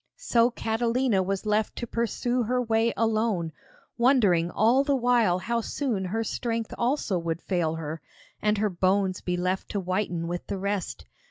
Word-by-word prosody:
So 240 - +3
Catalina 230 -1 0
was 195 +2 -2
left 215 0 0
to 240 - -4
pursue 235 +2 -1
her 250 +2 0
way 225 -1 +2
alone, 215 -6 +1 0.5
wondering 210 -10 +4
all 235 +8 +3
the 280 -1 +1
while 240 -7 +3
how 235 +5 -1
soon 230 -6 -2
her 220 +5 -1
strength 230 0 -3
also 235 -7 0
would 165 -1 -3
fail 170 -4 -1
her, 160 0 -5 0.4
and 210 0 +2
her 210 +1 +1
bones 185 +1 +1
be 180 0 -2
left 185 +2 -1
to 205 - -2
whiten 185 -2 -2
with 175 +1 -4
the 200 - -3
rest. 200 -1 -3
215 Hz, 165 wpm, -26 LUFS, 185-235 Hz, 0.5 s, wondering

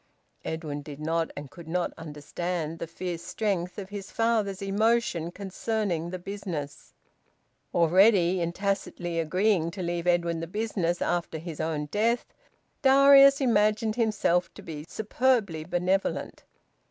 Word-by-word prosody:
Edwin 155 -3 -4
did 145 -1 -9
not 165 +1 0
and 145 -2 -7
could 170 -3 -12
not 175 +2 -1
understand 165 +1 -4
the 165 - -4
fierce 170 0 -5
strength 180 -3 -2
of 195 -2 -6
his 205 -1 -7
father's 220 -4 0
emotion 200 -4 +1
concerning 195 -2 -2
the 185 - -4
business. 180 -6 -6 0.8
Already 180 +1 +4
in 170 0 0
tacitly 185 -3 -2
agreeing 180 +1 +1
to 185 +2 -6
leave 170 0 -2
Edwin 170 -1 +2
the 165 - -4
business 185 -3 -1
after 170 -2 -1
his 160 -1 -7
own 155 -2 -1
death, 225 +9 0 0.5
Darius 275 0 +7
imagined 215 -2 +2
himself 205 -6 +1
to - - -11
be 150 -2 -7
superbly 220 -7 0
benevolent. 180 +3 -1
180 Hz, 130 wpm, -27 LUFS, 165-210 Hz, 0.8 s, Darius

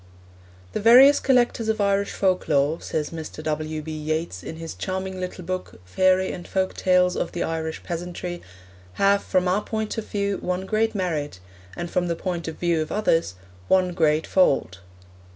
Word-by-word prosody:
'The - - -2
various 255 +6 +8
collectors 240 -3 +2
of 220 - 0
Irish 200 0 +1
folk 185 -2 0
lore,' 145 +2 +2
says 150 -2 -3
Mr. 160 -1 -7
W. 155 0 -3
B. 160 - -6
Yeats 155 - -3
in 160 - -7
his 165 0 -7
charming 190 0 -4
little 180 0 -5
book 185 - -5
Fairy 185 - +2
and 175 - -8
Folk 190 -1 -1
Tales 180 -1 +3
of - - -3
the 175 - -1
Irish 160 -1 -3
Peasantry, 175 0 -5 0.5
'have, 200 - +3
from 185 0 +1
our 190 +3 +2
point 220 +1 -3
of 215 - -7
view, 200 -1 -1
one 180 +1 -2
great 220 +2 0
merit, 155 - -2 0.4
and 175 0 -5
from 180 -1 0
the 170 - -1
point 170 -1 -4
of 160 - -4
view 170 -2 0
of 155 - -4
others, 165 - +1 0.3
one 185 -1 +3
great 160 -2 +2
fault.' 135 - +2
180 Hz, 175 wpm, -24 LUFS, 160-195 Hz, 0.5 s, various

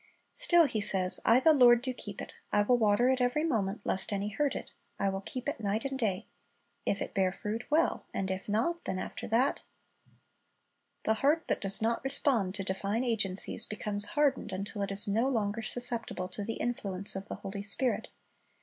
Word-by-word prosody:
Still 345 -9 +4
He 220 -7 -2
says, 185 -2 +6
"I 230 +3 +5
the 315 +4 +4
Lord 240 -3 +5
do 260 -1 -3
keep 205 -5 -8
it; - - -11 0.2
I 205 - +2
will 245 +3 +2
water 215 +2 +2
it 260 -1 0
every 250 +5 0
moment; 215 -9 -2
lest 190 - 0
any 200 +1 -3
hurt 285 +6 -2
it, - - -7 0.3
I 200 - 0
will 195 0 -4
keep 250 +6 -7
it 285 - -3
night 210 +3 -2
and 270 -1 -4
day."* 200 -6 -2 0.6
"If 200 - -1
it - - -10
bear 190 -2 +1
fruit, 215 +4 -6
well; 315 +2 0
and 190 -1 -3
if 190 +2 -6
not, 295 +12 -1
then 185 - -3
after - - -6
that" 245 +5 0 0.7
— - - -47
The 220 - +2
heart 305 +4 +2
that - - -1
does 195 +2 +1
not 230 +1 -1
respond 265 -8 0
to 200 - -3
divine 195 +5 -3
agencies 210 -6 +4
becomes 205 -1 -2
hardened 275 -7 +1
until 200 +2 -5
it 200 - -2
is 195 +1 +1
no 225 +5 0
longer 225 -4 -2
susceptible 235 -5 -1
to 205 +2 -6
the 225 +2 -4
influence 200 -6 -1
of 195 +1 -7
the - - -6
Holy 200 +1 -7
Spirit. 220 +5 +5
220 Hz, 200 wpm, -29 LUFS, 200-255 Hz, 0.7 s, says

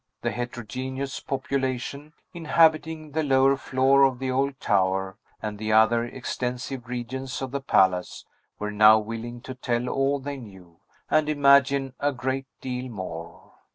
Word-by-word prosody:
The - - 0
heterogeneous 130 +3 -5
population, 135 +2 -3 0.2
inhabiting 160 -1 +2
the 160 +2 0
lower 135 -1 +4
floor 135 +1 +2
of 135 -2 +3
the 130 0 -2
old 135 +1 0
tower, 95 -1 +1 0.3
and 105 -1 -4
the 110 0 -2
other 110 +2 +5
extensive 125 0 -4
regions 125 +2 -5
of 135 -2 -4
the 140 0 -3
palace, 95 -8 +1 0.3
were 105 0 -4
now 105 +1 +7
willing 115 +2 -5
to 130 - -7
tell 125 -1 -2
all 135 +2 +1
they 140 +1 -5
knew, 95 -8 -13 0.3
and 155 -1 +3
imagine 140 -2 +4
a 145 0 +1
great 130 +1 -3
deal 125 0 -4
more. 90 -6 -8
130 Hz, 145 wpm, -25 LUFS, 115-140 Hz, 0.3 s, now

